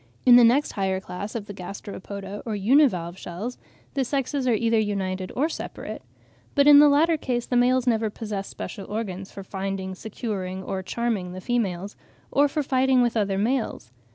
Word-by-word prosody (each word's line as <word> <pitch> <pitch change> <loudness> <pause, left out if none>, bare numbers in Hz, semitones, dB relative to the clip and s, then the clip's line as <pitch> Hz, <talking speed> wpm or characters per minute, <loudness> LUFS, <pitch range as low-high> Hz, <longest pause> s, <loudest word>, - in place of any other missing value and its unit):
In 245 -1 +9
the 245 - +8
next 250 +6 +4
higher 190 -2 -1
class 195 +3 -7
of 220 -3 -3
the 205 - -8
Gasteropoda, 200 +1 -7
or 220 -3 -3
univalve 200 - +3
shells, 205 +9 -6 0.3
the 275 - +1
sexes 270 0 -1
are 240 - +4
either 230 0 +2
united 190 -3 -2
or 285 +5 +2
separate. 330 - -6 0.5
But 280 -1 +5
in 290 -1 +9
the 295 0 +8
latter 315 +3 +4
case 245 -4 -2
the 250 - -2
males 250 +1 +3
never 225 -3 +2
possess 205 -2 -5
special 205 -1 -7
organs 195 -3 -4
for 195 - -8
finding, 190 0 -4
securing, 190 -2 -5
or 190 0 -3
charming 200 -3 -2
the 185 - -6
females, 200 -4 -2 0.4
or 285 +1 +4
for 295 +1 -2
fighting 260 -1 +3
with 240 -1 0
other 200 -3 +1
males. 220 - -1
215 Hz, 180 wpm, -25 LUFS, 190-250 Hz, 0.5 s, In